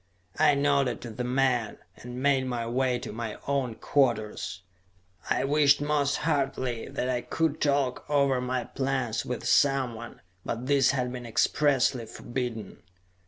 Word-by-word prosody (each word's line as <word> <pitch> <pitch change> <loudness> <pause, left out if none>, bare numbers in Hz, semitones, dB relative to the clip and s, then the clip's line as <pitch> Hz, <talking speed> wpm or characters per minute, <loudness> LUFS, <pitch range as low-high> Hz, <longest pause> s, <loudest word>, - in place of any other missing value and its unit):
I 145 - +5
nodded 140 -4 +1
to 120 - -7
the 125 +3 -4
man, 125 -3 +1 0.2
and 125 +2 -8
made 135 -2 +3
my 120 -2 -2
way 125 +1 0
to 120 - -7
my 115 -1 -5
own 135 -5 0
quarters. 110 -8 0 0.7
I - - +1
wished 145 0 +4
most 145 -1 +1
heartily 135 -6 -1
that 125 - -3
I 125 -1 0
could 160 +1 -1
talk 140 -3 +1
over 140 -3 +2
my 125 0 -1
plans 130 -4 -2
with 125 - -4
someone, 125 -5 +1 0.2
but 120 +2 -4
this 135 -1 +4
had 125 -2 0
been 120 -1 -6
expressly 130 0 +2
forbidden. 120 -5 -5
130 Hz, 145 wpm, -27 LUFS, 120-140 Hz, 0.7 s, I